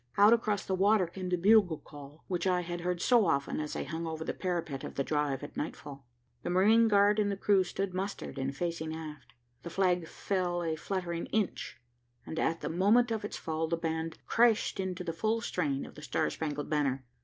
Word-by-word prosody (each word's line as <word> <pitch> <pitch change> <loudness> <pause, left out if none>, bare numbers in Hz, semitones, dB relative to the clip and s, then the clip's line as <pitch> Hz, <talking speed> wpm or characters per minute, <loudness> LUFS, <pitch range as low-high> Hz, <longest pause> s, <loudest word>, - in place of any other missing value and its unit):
Out 205 +3 +7
across 215 -3 0
the 190 - -2
water 195 +1 +4
came 180 +2 -6
the 180 - +1
bugle 190 -3 +5
call, 145 +1 -13
which 180 0 -1
I 180 -1 +2
had 175 0 -5
heard 180 0 -1
so 235 -6 +5
often 140 -2 0
as 150 -1 -4
I - - -2
hung 165 +1 -4
over 160 0 -4
the - - -3
parapet 170 -7 -3
of - - -7
the 140 - 0
Drive 145 -2 -1
at 145 - -8
nightfall. 140 -3 -6 0.3
The - - -4
marine 215 +6 +5
guard 205 0 +4
and 205 -1 +2
the 200 - -3
crew 195 -1 +3
stood 185 +1 -3
mustered 190 -6 -4
and 135 +1 -3
facing 165 -2 -3
aft. 150 -6 -9 0.3
The 170 - -7
flag 180 -1 +1
fell 180 -2 -1
a 160 -1 -1
fluttering 170 0 -3
inch, 205 - -2 0.5
and 160 - -4
at 165 0 0
the - - -3
moment 210 +8 +3
of 220 -2 -2
its 205 - -4
fall 160 0 -2
the 170 +1 0
band 160 0 -3
crashed 230 -3 +3
into 185 -1 -3
the 165 -2 -3
full 220 +6 0
strain 150 -11 -1
of - - -12
the 150 - -11
Star 140 -5 -1
Spangled 150 -2 -3
Banner. 140 -4 0
175 Hz, 210 wpm, -31 LUFS, 155-195 Hz, 0.5 s, Out